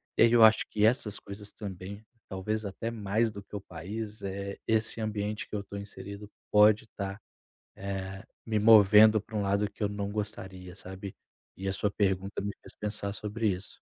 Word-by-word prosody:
E - - +1
aí 115 - +7
eu 120 -1 +7
acho 110 0 +6
que 105 0 +2
essas 110 -3 +2
coisas 100 +1 -9
também, 100 +1 -8 0.2
talvez 105 +3 -2
até 105 +3 -4
mais 110 +1 0
do 100 -1 -8
que 100 - -11
o 100 - -4
país 105 +5 -6
é 100 0 -4
esse 110 0 +1
ambiente 105 0 -2
que - - -5
eu 105 - -1
estou 100 0 -7
inserido 100 0 -9 0.2
pode 105 +1 +6
estar, 100 -2 -6 0.6
eh, 95 0 -5 0.2
me 110 -1 -1
movendo 110 0 +7
para 110 +2 -11
um 105 - +1
lado 100 +1 +1
que 105 - -6
eu - - +3
não 100 0 -3
gostaria, 95 -4 -3
sabe, 95 0 -7 0.4
e 95 - -5
a - - -1
sua 100 +1 0
pergunta 95 0 0
me 100 - -2
fez - - -10
pensar 105 -1 -1
sobre 105 +1 -1
isso. 95 +1 -5
105 Hz, 190 wpm, -29 LUFS, 100-110 Hz, 0.6 s, aí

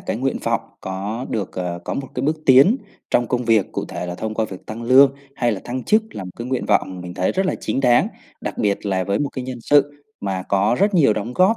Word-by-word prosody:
cái - - -3
nguyện - - -1
vọng - - +1 0.2
có 100 +6 -4
được, 105 -4 -2
ờ, 90 -1 -3
có - - -3
một 135 -1 -4
cái 125 - -2
bước 155 +3 +1
tiến 135 - +7 0.3
trong 120 - +2
công 125 -1 0
việc, 110 -4 +2
cụ - - -2
thể 90 - -5
là 90 - -4
thông 110 +4 -4
qua 110 - +1
việc 95 -3 -9
tăng 110 +2 -6
lương 135 +3 +6 0.2
hay 120 -2 +1
là 100 - -4
thăng 125 +1 -4
chức 215 +1 +4
là 100 - -5
một 90 - -7
cái 120 - -5
nguyện 130 0 -2
vọng 95 -1 +1
mình 90 0 -7
thấy 90 - 0
rất 190 +1 0
là - - 0
chính - - -1
đáng, 125 -2 +4 0.3
đặc - - -5
biệt 100 0 0
là 95 -2 0
với 100 +1 0
một 145 - 0
cái 130 -2 -6
nhân 125 -2 -6
sự 145 +2 +2 0.2
mà 95 -2 -2
có 100 +4 +2
rất 200 0 +2
nhiều 140 -10 +5
đóng 110 +4 -4
góp, 195 +5 +4
120 Hz, 265 wpm, -21 LUFS, 100-135 Hz, 0.3 s, tiến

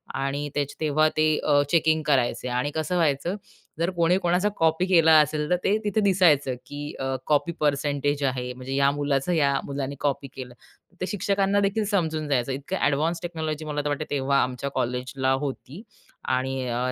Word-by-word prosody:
आणि 140 +2 -2
त्याचं 145 -1 -1
तेव्हा 155 0 +3
ते 155 - +4
अ, 145 -1 +3
चेकिंग 160 0 +3
करायचे, 125 -3 +1
आणि 125 +3 -1
कसं 160 +3 -1
व्हायचं, 165 +3 +1 0.4
जर 170 +2 +1
कोणी 170 +2 +3
कोणाचा 180 +3 +1
कॉपी 160 +2 +2
केला 165 -3 +5
असेल, 150 +1 -1
तर 180 - +4
ते 205 +2 +2
तिथे 210 +1 0
दिसायचं 170 -10 +3
की 145 +1 -7
अ, 135 0 -2
कॉपी 150 +3 +2
पर्सेंटेज 145 -1 0
आहे, 125 -2 -1
म्हणजे 130 +1 -6
या 140 0 +4
मुलाचं 145 +2 -1
या 140 -4 +2
मुलाने 140 0 -4
कॉपी 140 -1 -1
केलं. 125 -2 -8 0.5
ते - - 0
शिक्षकांना 200 +1 +1
देखील 200 +2 +1
समजून 160 -7 -1
जायचं. 135 -2 0
इतकं 140 +8 -4
एडवान्स 160 +4 0
टेक्नॉलॉजी 160 -3 -4
मला 150 -1 -2
तर - - -2
वाटते 145 +1 -2
तेव्हा 140 -1 +1
आमच्या 130 +2 -3
कॉलेजला 130 +1 -1
होती 140 - -6 0.5
आणि 130 0 -2
अ, 125 +2 -1
145 Hz, 175 wpm, -25 LUFS, 135-165 Hz, 0.5 s, केला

